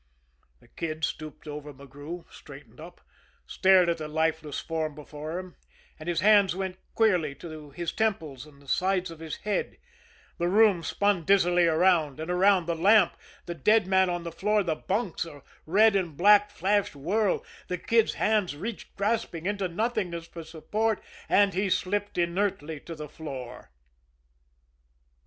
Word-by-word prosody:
The - - -21
Kid 155 -1 -3
stooped 155 -1 -7
over 150 0 -7
McGrew, 145 +5 -9
straightened - - -13
up, - - -12 0.4
stared 190 -2 +4
at 170 -1 0
the 155 - -4
lifeless 160 -1 -1
form 160 -2 -3
before 150 +2 -7
him, 185 -1 -8 0.4
and 155 +2 -6
his 170 -3 0
hands 200 -2 +5
went 190 -1 -4 0.2
queerly 180 -10 +2
to 155 0 -10
his 170 +4 -4
temples 160 - -2
and 145 -2 -18
the 140 - -20
sides 185 +3 0
of 165 - -11
his 160 -1 -5
head 210 - -2 0.6
the 170 - +1
room 200 -1 +4
spun 200 +1 0
dizzily 175 -1 +4
around 160 -3 +2
and 160 +3 -3
around, 185 0 +4
the 170 - -1
lamp, 195 +3 +4 0.3
the 175 - -4
dead 210 +7 +3
man 190 0 +3
on 175 -1 -2
the 170 - -5
floor, 210 +5 +1
the 170 -3 0
bunks, 195 +2 -2
a 145 -5 -11 0.2
red 210 +5 +5
and 175 -7 -1
black 205 +2 +6
flashed 200 -2 0
whirl 190 +8 0 0.2
the 180 - -2
Kid's 225 +5 +2
hands 210 -8 +1
reached 205 +8 -7
grasping 200 -5 -1
into 200 -1 -1
nothingness 185 -3 -2
for 165 0 -9
support, 210 +7 -2 0.3
and 200 -1 +4
he 195 +2 0
slipped 205 +2 -1
inertly 170 -3 -1
to 165 +3 -9
the 150 -1 -7
floor. 135 -5 -8
175 Hz, 160 wpm, -27 LUFS, 155-200 Hz, 0.6 s, black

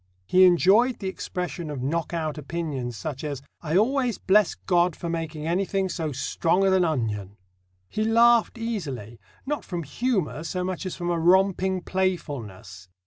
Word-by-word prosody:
He 185 - +6
enjoyed 195 +8 +4
the 195 - -5
expression 180 -3 -4
of 140 -4 -4
knock 160 +4 -1
out 155 -3 -3
opinions 140 -6 -4
such 145 0 -5
as: 140 -3 -4 0.2
"I 160 +1 0
always 250 +2 +2
bless 205 0 +3
God 175 -2 +1
for 170 - -4
making 160 -2 -4
anything 190 +2 0
so 160 -4 -3
strong 170 +7 0
as 190 -1 +4
an 185 -1 +4
onion!" 105 - -2 0.5
He 215 - -2
laughed 230 +1 +4
easily, 145 - -5 0.3
not 295 +2 -2
from 175 -3 -4
humour 185 - -1
so 180 +2 -3
much 185 +1 -3
as 185 - -5
from 175 -1 -2
a 170 - 0
romping 190 +1 +3
playfulness. 125 - -3
175 Hz, 160 wpm, -25 LUFS, 150-190 Hz, 0.5 s, He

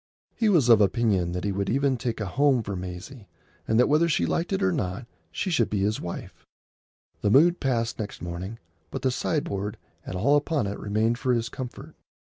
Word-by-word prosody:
He 225 -3 +2
was 165 - +4
of 115 -3 +7
opinion 100 -3 +2
that 90 - -3
he 100 - 0
would 100 0 -2
even 135 +2 +2
make 120 -2 -2
a 105 - -2
home 130 +4 +2
for 100 -1 -4
Maisie, 90 +6 -8 0.4
and 110 - +2
that 125 - +5
whether 155 +3 +3
she 150 - +2
liked 170 +3 -1
it 195 0 0
or 190 - +3
not 110 - -3 0.3
she 190 - -2
should 120 -9 +2
be 105 -2 -1
his 105 +2 0
wife. 85 - -7 0.8
The 105 - +2
mood 170 - +5
passed 115 -3 -1
next 105 -1 -5
morning, 90 +5 -6 0.3
but - - -6
the 130 - +2
sideboard 105 - -2 0.3
and - - -6
all 135 +11 +4
upon 145 -3 0
it 100 +1 -4
remained 110 +3 0
for 130 -2 +1
his 115 -1 -1
comfort. 125 -2 -8
115 Hz, 205 wpm, -26 LUFS, 100-140 Hz, 0.8 s, of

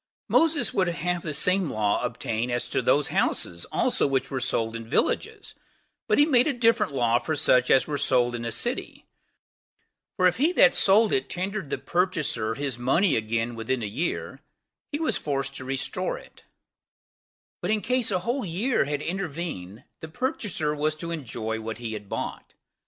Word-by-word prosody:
Moses 325 -3 +2
would 185 -2 +2
have 175 0 -1
the 160 - -4
same 185 +4 +2
law 105 -3 0
obtain 115 +2 -2
as 120 0 -1
to - - +1
those - - +2
houses 85 -1 0
also - - +2
which 135 0 -1
were 135 - -1
sold 115 -2 0
in 115 0 -7
villages; 440 - -1 0.5
but - - +3
he 290 - +6
made 255 -4 +4
a 295 - +1
different 230 - +2
law 120 -3 +2
for 155 +5 -2
such 125 -3 +3
as 130 - +5
were 145 -2 -3
sold 125 -3 +3
in 120 -1 -4
a 115 - -3
city; 240 - -3 1.1
for 185 - +3
if 180 +2 +4
he 300 +7 +3
that 275 -7 +6
sold 210 +2 +4
it 130 - 0
tendered 190 -2 -3
the - - -1
purchaser 155 -11 -1
his 140 -4 -3
money 150 +9 +3
again 115 +2 -1
within 115 +2 -2
a - - -1
year, 115 +12 -3 0.5
he 290 - -2
was 320 - 0
forced 135 -2 -2
to 130 - -7
restore 135 +7 -2
it; - - -16 1.2
but 175 - -2
in 215 0 +2
case 250 +2 0
a 190 - +1
whole 240 +7 -1
year 195 - 0
had 145 +1 -3
intervened, 160 - -5 0.2
the 160 - -7
purchaser 210 - -2
was 155 +1 0
to 170 +2 -6
enjoy 115 -7 -4
what 110 0 -5
he 115 -2 -5
had 105 -2 -8
bought. - - -5
150 Hz, 180 wpm, -26 LUFS, 120-195 Hz, 1.2 s, he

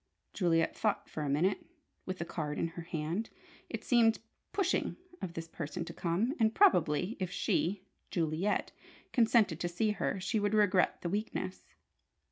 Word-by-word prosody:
Juliet 165 -3 +2
thought 205 -2 0
for 155 - -5
a 145 - -1
minute, 170 +8 +1 0.4
with 185 0 -3
the 170 - -3
card 150 -3 -3
in 165 - 0
her 170 +1 -7
hand. 165 +5 -3 0.4
It 225 -1 -5
seemed 230 -2 +4 0.3
"pushing" 395 - 0 0.2
of 170 - -4
this 165 0 -5
person 165 +1 -5
to - - -7
come, 185 +10 0
and 225 0 +3
probably 180 - +4
if 185 -2 -1
she 185 +1 0 0.3
Juliet 170 +4 0 0.4
consented 225 - +4
to 175 - -1
see 210 +5 +1
her, 200 -1 -1
she 210 +4 0
would 205 +1 +1
regret 205 -3 +3
the 170 - -1
weakness. 95 - -3
180 Hz, 160 wpm, -32 LUFS, 165-215 Hz, 0.4 s, seemed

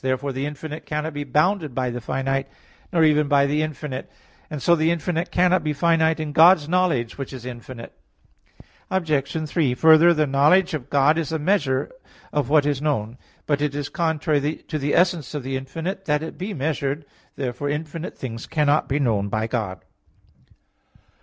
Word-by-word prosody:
Therefore 130 +2 -1
the 135 +2 -2
infinite 150 +1 -7
cannot 150 +1 -3
be 145 0 -3
bounded 150 +1 +1
by 130 -2 -1
the 120 +1 -5
finite, 135 +3 -2 0.4
nor 170 -3 +3
even 150 -1 +4
by 140 -1 +4
the 145 +2 +1
infinite; 150 -3 -5 0.4
and 150 - -5
so 170 +5 +4
the 160 0 +1
infinite 170 +1 -1
cannot 180 +1 +2
be 150 -1 -1
finite 160 +1 +2
in 155 -1 -3
God's 160 0 +6
knowledge, 165 -10 0
which 135 - -5
is 130 -3 -9
infinite. 120 -1 -9 1.0
Obj. 155 -3 -1
3: 145 -6 +1
Further, 160 +4 +6
the 155 -2 +2
knowledge 150 +7 +3
of 140 -3 -5
God 145 +3 +3
is 160 - -3
the 160 - -1
measure 150 -5 0 0.4
of 145 -1 0
what 150 -1 +4
is 145 -2 0
known. 125 -6 -2 0.3
But 145 -1 0
it 145 -1 -1
is 145 -1 -3
contrary 155 -3 0
to 155 - -2
the 145 +1 0
essence 175 -4 +1
of 145 - -3
the 135 +1 -3
infinite 165 +9 -5
that 150 0 +1
it 160 - -6
be 190 +4 -5
measured. 145 0 -2 0.3
Therefore 135 +1 -3
infinite 155 +3 -5
things 115 -3 -6
cannot 150 -1 +1
be 135 - +1
known 110 -8 0
by 110 +2 -1
God. 110 -5 -3
150 Hz, 180 wpm, -23 LUFS, 135-160 Hz, 1.0 s, God's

